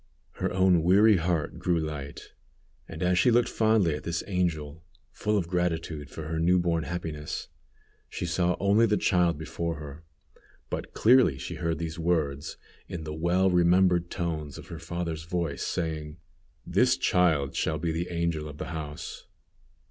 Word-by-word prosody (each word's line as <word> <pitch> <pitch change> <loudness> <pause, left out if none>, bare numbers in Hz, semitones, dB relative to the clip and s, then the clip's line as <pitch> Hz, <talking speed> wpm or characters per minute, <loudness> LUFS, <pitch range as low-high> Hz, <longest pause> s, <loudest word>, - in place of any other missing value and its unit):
Her - - -3
own 95 -2 +4
weary 100 +5 +5
heart 85 -2 -1
grew 85 -2 +1
light, 75 -3 -6 0.5
and 80 - -6
as 90 0 +3
she 125 - +5
looked 120 0 +3
fondly 110 -7 +2
at 75 - -4
this 85 0 -2
angel, 80 -5 -2 0.3
full 105 0 0
of 90 -4 -1
gratitude 85 -4 -2
for 80 - -7
her 80 +1 -3
new 90 +3 +4
born 85 -2 0
happiness, 80 -4 -5 0.6
she - - -4
saw 90 +1 +1
only 100 +4 +4
the 105 -1 +2
child 90 -4 +2
before 80 +2 -3
her, 75 +1 -9 0.7
but - - -5
clearly 120 - +5
she 65 - -6
heard 85 -1 -2
these 80 0 -5
words, 75 -4 -1 0.3
in 85 -3 -6
the 75 -1 -5
well 90 +4 +2
remembered 90 0 +3
tones 80 -5 -3
of - - -11
her 85 - -7
father's 85 -1 -4
voice, 85 -5 -2
saying: 80 -3 -3 0.5
"This - - +3
child 80 -7 +2
shall 80 - 0
be 80 +1 -1
the 85 +2 -3
angel 85 -3 -2
of 75 - -10
the - - -5
house." 75 -2 -7
85 Hz, 165 wpm, -27 LUFS, 80-90 Hz, 0.7 s, weary